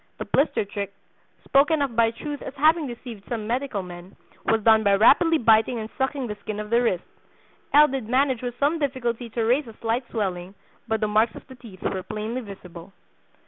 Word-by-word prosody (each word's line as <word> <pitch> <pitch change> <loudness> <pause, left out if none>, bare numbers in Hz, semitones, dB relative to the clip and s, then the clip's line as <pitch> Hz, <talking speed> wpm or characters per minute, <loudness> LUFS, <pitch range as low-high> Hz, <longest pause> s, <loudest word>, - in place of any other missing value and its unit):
The - - -5
'blister 275 -6 +1
trick,' 200 0 -5 0.5
spoken 295 +3 +3
of 260 -5 -3
by 230 0 +4
Truth 290 +5 -6
as 270 - -7
having 310 +2 +3
deceived 235 -4 -9
some 225 -3 -3
medical 240 -3 -2
men, 180 +1 -11 0.3
was 225 -1 +2
done 220 0 +6
by 200 -1 +4
rapidly 320 - +5
biting 225 -1 +3
and 220 0 -6
sucking 265 0 -1
the 215 - -4
skin 215 -1 -5
of 210 +1 -6
the 235 +1 +4
wrist. 185 -7 0 0.7
L. 300 +1 +7
did 255 -5 -4
manage 260 -1 +2
with 245 -1 -5
some 300 +4 +1
difficulty 245 -4 -2
to 230 +1 -2
raise 250 +4 +2
a 225 - -12
slight 230 +2 -2
swelling, 190 -4 -3 0.3
but 220 0 -1
the 215 - +1
marks 215 +1 +2
of - - -11
the 260 - -12
teeth 230 -7 -13
were 190 - -2
plainly 215 +5 -4
visible." 190 -4 -11
230 Hz, 200 wpm, -24 LUFS, 210-265 Hz, 0.7 s, L